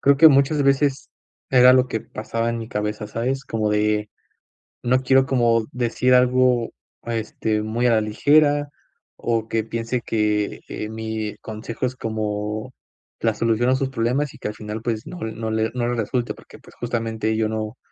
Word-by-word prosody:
Creo 140 0 +5
que 160 +3 +9
muchas 140 +1 +3
veces 140 0 +1 0.4
era 125 -1 +7
lo 130 0 +4
que 110 - -2
pasaba 115 +2 -3
en 115 - -3
mi 115 - -6
cabeza, 105 0 -3
¿sabes? 125 +5 -2
Como 110 -3 -1
de, 105 0 +1 0.7
no 130 +1 +2
quiero 135 0 +4
como 120 -4 +2
decir 125 +1 +1
algo, 125 -1 +4 0.4
eh, 115 -1 -1
este, 110 0 -2
muy 115 +3 0
a - - +4
la 110 - +3
ligera 145 +6 +3 0.5
o 115 -1 -1
que 110 -1 0
piense 115 +2 -3
que, 105 -2 0
eh, 105 - -5
mi 110 -1 -4
consejo 110 +3 -5
es 130 - -6
como 110 +1 -3 0.5
la 115 -1 +1
solución 115 +2 +1
a 130 - +4
sus 130 0 -1
problemas 130 +3 -1
y - - -13
que, - - -5
al - - -5
final, 105 +1 -6
pues, 115 -2 -3
no 180 - -7
no 110 -3 -4
le 110 0 0
no 120 -1 -1
le 120 - 0
resulte, 120 +2 -2
porque, - - -15
pues, - - -18
justamente, 115 -2 -2
yo 110 -1 +1
no 110 +2 -4
115 Hz, 185 wpm, -22 LUFS, 110-130 Hz, 0.7 s, que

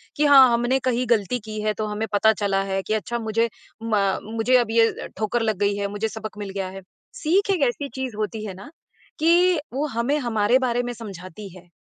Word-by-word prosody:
कि 300 - +2
हाँ, 270 -3 +8
हमने 240 +3 +1
कहीं 250 0 0
गलती 235 +1 +1
की 215 -1 -5
है 215 0 0
तो 215 - -3
हमें 210 +1 -3
पता 220 +2 +4
चला 195 -2 0
है 195 0 -2
कि 215 - 0
अच्छा 235 +3 -2
मुझे 230 +1 0 0.3
म 225 -1 0 0.3
मुझे 225 +3 +2
अब 240 -3 0
ये 225 0 +4 0.3
ठोकर 220 +2 -1
लग 220 -3 0
गई 200 0 +1
है, 200 0 -1
मुझे 205 +2 -2
सबक 215 -1 -7
मिल 205 -1 -5
गया 190 -1 -3
है। 195 +1 -9 0.3
सीख 395 -3 +1
एक 365 -6 0
ऐसी 280 +4 -3
चीज़ 260 -4 -4
होती 215 0 -3
है 200 - -5
ना 195 +9 -12 0.5
कि 345 +2 +4
वो 285 +3 -1
हमें 245 +4 0
हमारे 235 -2 +2
बारे 245 -2 0
में 245 0 -4
समझाती 195 -2 -9
है। 180 0 -17
225 Hz, 220 wpm, -23 LUFS, 205-250 Hz, 0.5 s, हाँ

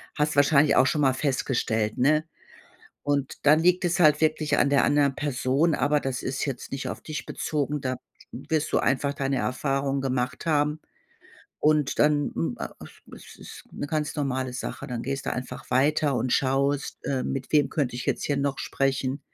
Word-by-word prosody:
Hast 150 0 +1
du - - -8
wahrscheinlich 145 0 +5
auch - - +5
schon 150 +2 +1
mal 135 -2 +4
festgestellt, 120 -5 -1
ne? 150 +4 +3 0.8
Und 140 -2 -1
dann 150 +2 +6
liegt 180 +2 +3
es 175 0 +1
halt 150 -3 +5
wirklich 155 -2 +1
an 140 - +3
der 140 - +4
anderen 145 -2 +3
Person, 145 +3 +1
aber 145 0 +2
das 135 -2 -3
ist 135 +1 -2
jetzt 135 -3 -5
nicht 135 0 -3
auf - - -6
dich 155 -2 -6
bezogen, 150 -1 -2
da 130 -2 -2 0.4
wirst 150 +5 -2
du - - +4
einfach 140 +2 +1
deine 135 -1 -1
Erfahrung 135 +2 -1
gemacht 130 +2 -2
haben. 150 -1 +1 0.8
Und 150 -2 +2
dann, 150 -1 +3
m 80 - -1
a - - -6 0.4
es - - -13
ist - - -11
'ne 145 - -5
ganz 150 -1 -2
normale 130 -3 -2
Sache. 130 +2 -5
Dann 120 -2 -4
gehst 135 +1 -4
du - - -1
einfach 125 0 -7
weiter 140 +2 +2
und 125 0 -1
schaust, 140 +1 0
äh, 130 -2 -1
mit 135 -1 -4
wem 145 -3 +3
könnte 135 -6 -1
ich 125 - -5
jetzt - - -1
hier 145 -1 0
noch 140 -1 -1
sprechen? 135 0 -1
140 Hz, 185 wpm, -26 LUFS, 130-150 Hz, 0.8 s, dann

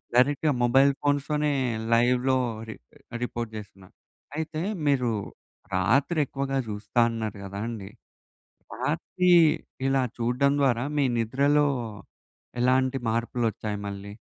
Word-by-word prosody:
డైరెక్ట్‌గా 145 +4 +3
మొబైల్ 135 +3 +5
ఫోన్స్‌తోనే 145 +1 +1 0.4
లైవ్‌లో 125 +2 +3 0.3
రి 110 - -6 0.5
రిపోర్ట్ 120 -2 -4
చేస్తున్నారు. 95 -3 -12 0.4
అయితే, 160 0 -3 0.3
మీరు 125 -4 +2 0.6
రాత్రి 135 - +2
ఎక్కువగా 135 0 -3
చూస్తా 105 +3 -2
అన్నారు 110 -3 -4
కదండీ. 100 +1 -5 0.9
రాత్రి 180 0 0 0.6
ఇలా 135 0 +2 0.2
చూడడం 125 +4 +2
ద్వారా, 125 -3 +2
మీ 145 - +3
నిద్రలో 140 +6 +2 0.9
ఎలాంటి 130 +1 +2
మార్పులోచ్చాయి 115 -2 -2
మళ్ళీ? 100 0 -7
125 Hz, 95 wpm, -26 LUFS, 110-140 Hz, 0.9 s, మొబైల్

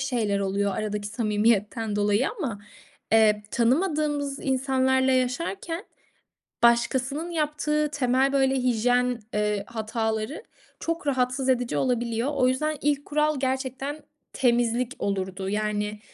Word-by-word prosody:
şeyler 225 -7 0
oluyor 200 0 0
aradaki 210 -1 -3
samimiyetten 215 -1 0
dolayı 205 +5 +2
ama, 235 - -3 0.5
eee, 215 -1 +5
tanımadığımız 290 +1 +1
insanlarla 265 0 +2
yaşarken, 330 - -1 0.8
başkasının 260 +7 +2
yaptığı 300 -1 0
temel, 265 0 +2
böyle, 270 -1 +3
hijyen, 245 0 +1
eee, 210 -1 0
hataları 220 - -3 0.4
çok 330 -2 -3
rahatsız 260 0 0
edici 245 -2 +1
olabiliyor. 240 +1 0
O 255 -2 +3
yüzden 305 +4 0
ilk 285 -1 0
kural 300 -1 +1
gerçekten 265 +2 -2 0.3
temizlik 240 0 +1
olurdu, 190 -1 -2
yani, 210 0 -2
250 Hz, 110 wpm, -26 LUFS, 215-275 Hz, 0.8 s, eee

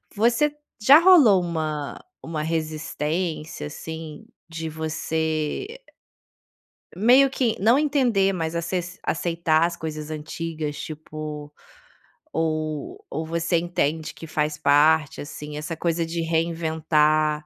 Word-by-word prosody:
Você 240 +8 +2 0.3
já 280 +8 +8
rolou 300 - +7
uma 155 -4 -3 0.2
uma 160 -2 -4
resistência, 155 0 -3
assim, 160 0 -8 0.2
de 160 0 -5
você 160 - -2 1.2
meio 250 +7 +6
que 245 -4 0
não 230 +7 +5
entender, 250 -10 +2
mas 165 -2 -3
aces 180 +2 -3
aceitar 165 -1 +1
as 170 0 -1
coisas 155 -1 -6
antigas, 155 0 -5
tipo 150 -1 -7 0.8
ou 155 - -2
ou 160 - -3
você 170 +2 0
entende 160 -2 -1
que - - -10
faz 150 0 -1
parte, 150 +1 +3
assim, 150 0 -7
essa 155 +2 -4
coisa 165 +1 -1
de 165 +1 -3
reinventar. 160 -2 +1
160 Hz, 110 wpm, -24 LUFS, 155-175 Hz, 1.2 s, já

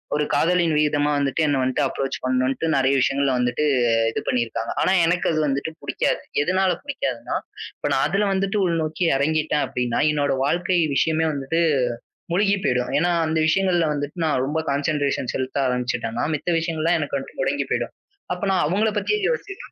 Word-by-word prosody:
ஒரு 150 0 +1
காதலின் 170 -2 +2
வீதமா 150 -1 +2
வந்துட்டு 140 +2 0
என்னை 145 -2 +1
வந்துட்டு 130 0 0
அப்ரோச் 135 0 -2
பண்ணுண்ட்டு 130 +4 0
நறைய 135 0 +3
விஷயங்கள்ல 135 -1 +1
வந்துட்டு 125 +3 0 0.5
இது 115 - -3
பண்ணிருக்காங்க. 115 -1 -1
ஆனா - - +2
எனக்கு 175 +2 +1
அது 155 - 0
வந்துட்டு 140 +2 -1
பிடிக்காது. - - -1 0.2
எதனால 185 +4 +2
பிடிக்காதுன்னா, 285 -1 -3 0.4
இப்ப - - -3
நான் - - +2
அதுல 200 +1 +1
வந்துட்டு 195 +2 0
உள்நோக்கி 165 0 -1
இறங்கிட்டேன் 150 +1 +1
அப்படின்னா, 125 -1 -1
என்னோட 145 -2 0
வாழ்க்கை 175 +4 +1 0.2
விஷயமே 160 +4 +2
வந்துட்டு 145 +4 -1 0.7
முழுகி 200 +2 +3
போயிடும். 125 0 0
ஏன்னா 175 +2 +2 0.2
அந்த 160 0 0
விஷயங்கள்ல 175 0 +2
வந்துட்டு 145 +3 -5
நான் 140 -5 +1
ரொம்ப 150 +4 -1
கான்சென்ட்ரேஷன் 140 -2 -1
செலுத்த 130 0 -3
ஆரம்பிச்சிட்டேன்னா 125 -2 -2
மித்த 150 +4 -3
விஷயங்கள் 165 -1 -2
எல்லாம் 170 0 +2
எனக்கு 145 -2 -2
வந்துட்டு 135 - -9
முடங்கிப் - - -1
போயிடும். - - -1 0.4
அப்ப 180 +2 -7
நான் 185 -2 +2
அவங்களை 205 +7 +1
பத்தியே 425 - 0
யோசிச்சிட்டுருப் 405 -5 -5
150 Hz, 165 wpm, -22 LUFS, 135-175 Hz, 0.7 s, நறைய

